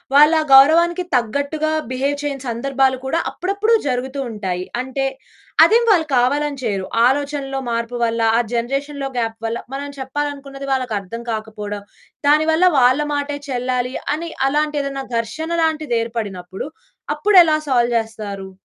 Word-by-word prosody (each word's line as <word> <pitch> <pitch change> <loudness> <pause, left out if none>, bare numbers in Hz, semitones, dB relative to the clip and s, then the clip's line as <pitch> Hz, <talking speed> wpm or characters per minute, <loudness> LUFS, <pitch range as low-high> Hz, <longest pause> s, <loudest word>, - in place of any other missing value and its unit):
వాళ్ళు 300 +3 +7
ఆ - - -1
గౌరవానికి 335 +6 +6
తగ్గట్టుగా 285 +6 0 0.2
బిహేవ్ 275 +3 0
చేయని 280 -2 -4
సందర్భాలు 260 +2 +1
కూడా 320 +5 0
అప్పుడప్పుడు 400 +5 0
జరుగుతూ 260 +1 -2
ఉంటాయి. 185 -4 -3 0.2
అంటే 265 +1 -3 0.6
అదేం 465 +2 +4
వాళ్ళు 330 -5 +3
కావాలని 285 +3 +1
చేయరు. 195 -4 -1 0.2
ఆలోచనలో 275 0 -1
మార్పు 235 +1 -2
వల్ల, 230 0 0 0.2
ఆ - - +4
జనరేషన్‌లో 275 +4 -2
గ్యాప్ 225 -1 -1
వల్ల, 225 +1 -1 0.2
మనం 285 +1 -4
చెప్పాలనుకున్నది 275 0 -5
వాళ్ళకర్థం 230 -4 -2
కాకపోవడం, 210 -2 -5 0.4
దానివల్ల 315 +4 +4
వాళ్ళ 255 +3 +4
మాటే 285 0 -2
చెల్లాలి 250 0 -1 0.2
అని 335 +2 -5 0.2
అలాంటేదన్నా 285 -2 -1 0.2
ఘర్షణ 305 +9 -4
లాంటిదేర్పడినప్పుడు, 230 - -2 0.5
అప్పుడెలా 355 -7 +5
సాల్వ్ 240 -2 +2
జేస్తారు. 210 -3 -5
270 Hz, 120 wpm, -19 LUFS, 230-295 Hz, 0.6 s, వాళ్ళు